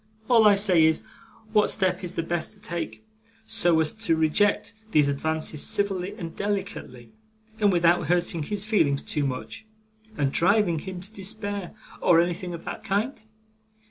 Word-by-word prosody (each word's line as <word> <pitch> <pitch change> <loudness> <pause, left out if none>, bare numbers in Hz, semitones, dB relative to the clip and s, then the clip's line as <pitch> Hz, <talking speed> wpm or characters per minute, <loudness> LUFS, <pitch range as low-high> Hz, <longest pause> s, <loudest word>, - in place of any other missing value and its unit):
All 230 -4 +6
I 205 - +6
say 190 -5 +3
is, 160 0 +2 0.5
what 210 -1 +4
step 185 -2 +1
is 180 0 -4
the 165 - -1
best 170 0 -2
to 210 - -13
take, 185 +2 -6 0.4
so 175 -8 +3
as 155 -1 +1
to 220 -7 +1
reject 160 +9 +1 0.2
these 150 -2 +4
advances 155 +1 -1
civilly 195 -1 0
and 170 -6 -7
delicately, 195 - -4 0.5
and 205 -2 +4
without 175 -1 +3
hurting 175 -1 +1
his 205 +6 -3
feelings 160 -11 +1
too 145 -2 -1
much, 130 - -6 0.5
and 140 -2 +1
driving 180 -1 +2
him 185 +1 -7
to 200 +4 -8
despair, 205 -1 -4 0.3
or 165 - +5
anything 175 +1 -1
of 165 - -11
that 220 - -6
kind? 220 +5 -2
180 Hz, 160 wpm, -25 LUFS, 160-205 Hz, 0.5 s, All